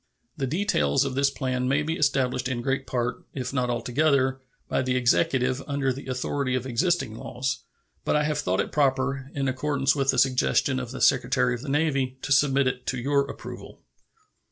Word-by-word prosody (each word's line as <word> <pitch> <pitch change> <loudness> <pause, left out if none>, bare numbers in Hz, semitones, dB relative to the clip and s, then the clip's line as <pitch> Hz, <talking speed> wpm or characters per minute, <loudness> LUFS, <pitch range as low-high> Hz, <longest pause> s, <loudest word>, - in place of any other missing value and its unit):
The 135 - -2
details 125 - +1
of 135 - -2
this 140 +1 +2
plan 130 -2 -2
may 140 +3 +2
be 160 +2 -2
established 130 -4 +1
in 120 -2 -3
great 135 +1 -1
part, 125 -1 -2
if 130 -1 -4
not 125 -2 0
altogether, 130 +1 +1 0.3
by - - 0
the 130 0 0
Executive 130 +1 +2
under 140 -2 0
the 135 +1 -9
authority 130 +1 -1
of 130 0 -2
existing 135 -1 0
laws, 125 +3 -4 0.4
but - - +1
I 150 - +3
have 150 0 -1
thought 90 +1 +1
it - - -5
proper, 135 -1 0
in 135 -1 0
accordance 135 +1 +1
with 135 -1 0
the 135 - +3
suggestion 130 +1 +2
of 125 -2 -5
the 130 - -7
Secretary 125 -1 +3
of 120 - -5
the 140 - -6
Navy, 135 -3 0
to - - -4
submit 140 0 +4
it 125 0 -2
to 135 - -1
your 140 +2 +1
approval. - - -9
130 Hz, 190 wpm, -26 LUFS, 125-140 Hz, 0.4 s, submit